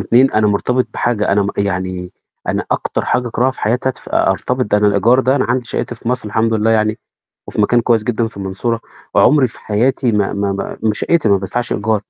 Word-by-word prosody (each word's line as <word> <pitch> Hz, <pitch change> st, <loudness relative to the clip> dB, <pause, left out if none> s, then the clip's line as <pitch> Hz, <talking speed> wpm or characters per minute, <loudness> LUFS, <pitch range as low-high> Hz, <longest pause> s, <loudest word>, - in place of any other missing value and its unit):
2 130 Hz, +3 st, +4 dB
أنا 110 Hz, 0 st, +2 dB
مرتبط 125 Hz, +5 st, +1 dB
بحاجة 110 Hz, -4 st, 0 dB
أنا 100 Hz, 0 st, +3 dB
م 100 Hz, -, -2 dB
يعني 95 Hz, -2 st, -2 dB, 0.4 s
أنا -, -, -1 dB
أكتر -, -, -1 dB
حاجة 125 Hz, -1 st, 0 dB
أكرهها 125 Hz, +3 st, +1 dB
في 130 Hz, -, -11 dB
حياتي 125 Hz, +4 st, 0 dB
أدف 130 Hz, -, -6 dB
أرتبط، 125 Hz, 0 st, 0 dB
ده 105 Hz, 0 st, +1 dB
أنا 105 Hz, -, +3 dB
الإيجار 105 Hz, +6 st, +4 dB
ده 130 Hz, +2 st, +2 dB
أنا 130 Hz, -, +1 dB
عندي 120 Hz, 0 st, -1 dB
شَقّتي 120 Hz, +1 st, -3 dB
في 115 Hz, -, -7 dB
مصر، 125 Hz, -4 st, -1 dB
الحمد 110 Hz, +1 st, +1 dB
لله 110 Hz, +1 st, +2 dB
يعني 110 Hz, 0 st, +1 dB, 0.5 s
وفي -, -, -3 dB
مكان 120 Hz, +4 st, +3 dB
كويس 115 Hz, -2 st, +1 dB
جدًا 115 Hz, -1 st, 0 dB
في 110 Hz, -, -10 dB
المنصورة، 100 Hz, +4 st, -2 dB, 0.4 s
عُمري 145 Hz, -1 st, +5 dB
في 115 Hz, -, -11 dB
حياتي 120 Hz, +3 st, +1 dB
ما 105 Hz, -2 st, +1 dB
ما 100 Hz, -1 st, -3 dB
ما 110 Hz, -1 st, +1 dB
شَقّتي 160 Hz, 0 st, +1 dB
ما 100 Hz, -, +5 dB
بادفعش 105 Hz, +6 st, -3 dB
إيجار. 110 Hz, 0 st, 0 dB
110 Hz, 215 wpm, -17 LUFS, 105-125 Hz, 0.5 s, عُمري